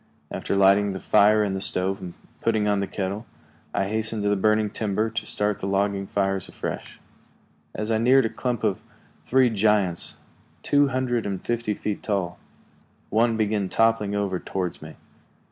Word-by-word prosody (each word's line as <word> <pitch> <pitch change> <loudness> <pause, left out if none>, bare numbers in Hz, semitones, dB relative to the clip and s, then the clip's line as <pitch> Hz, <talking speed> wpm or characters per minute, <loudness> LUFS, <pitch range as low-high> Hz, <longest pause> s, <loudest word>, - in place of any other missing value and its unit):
After - - -2
lighting 100 +1 +4
the 95 - -5
fire 105 +3 +4
in 100 -2 -1
the 95 - -3
stove 95 +1 -1
and 90 -2 -7 0.3
putting 110 -2 +1
on 105 -1 +2
the 100 - -1
kettle, 100 +4 -4 0.4
I 95 - 0
hastened 110 0 -1
to 105 - +2
the 105 - +3
burning 110 +1 +2
timber 110 +1 -1
to 115 -1 -3
start 105 0 0
the 95 - -3
logging 100 0 0
fires 95 -1 -1
afresh. - - -6 0.8
As 105 +1 -2
I 110 - +2
neared 130 +3 +5
a - - 0
clump 120 -1 -3
of - - 0 0.4
three 130 -1 +3
giants, 105 -4 +1 0.5
two 145 0 +4
hundred 125 -4 -1
and 95 -2 -3
fifty 115 -1 -2
feet 105 0 -3
tall, 95 -4 -2 0.7
one 115 +1 +2
began 105 -3 0
toppling 115 -2 +2
over 100 -3 -1
toward 90 -1 -4
me. 80 0 -10
105 Hz, 170 wpm, -25 LUFS, 95-110 Hz, 0.8 s, neared